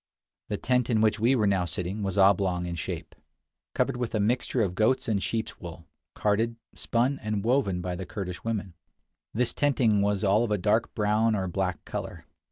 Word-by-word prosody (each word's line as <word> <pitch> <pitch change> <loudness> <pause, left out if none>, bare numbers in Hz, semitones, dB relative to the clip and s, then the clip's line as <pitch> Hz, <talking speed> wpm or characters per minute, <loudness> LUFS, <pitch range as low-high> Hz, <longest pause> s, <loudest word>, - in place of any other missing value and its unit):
The - - -2
tent 125 -1 +1
in 115 -3 +2
which 110 0 +2
we 120 +5 +3
were 110 -4 +2
now 95 -3 +2
sitting 90 +4 -4
was 100 -1 -2
oblong 95 -2 +3
in 85 - -4
shape, 85 - -5 0.6
covered - - +1
with 120 -2 -3
a - - +1
mixture 120 +2 +1
of 95 -3 -1
goats' 110 +7 +1
and 105 -3 +1
sheep's 110 +2 -3
wool, 85 -2 -9 0.3
carded, 110 +3 +1 0.2
spun, 125 +4 0
and 105 -2 -2
woven 115 -7 +1
by 90 0 -3
the 90 0 -6
Kurdish 90 -4 -6
women. 105 -5 -3 0.6
This 120 +2 0
tenting 120 -8 +2
was 100 0 +1
all 105 +3 +4
of 120 - -1
a 105 - +1
dark 105 +4 +1
brown 110 +1 +2
or 95 -2 -1
black 90 -1 -2
color. 85 -1 -6
105 Hz, 190 wpm, -27 LUFS, 95-115 Hz, 0.6 s, all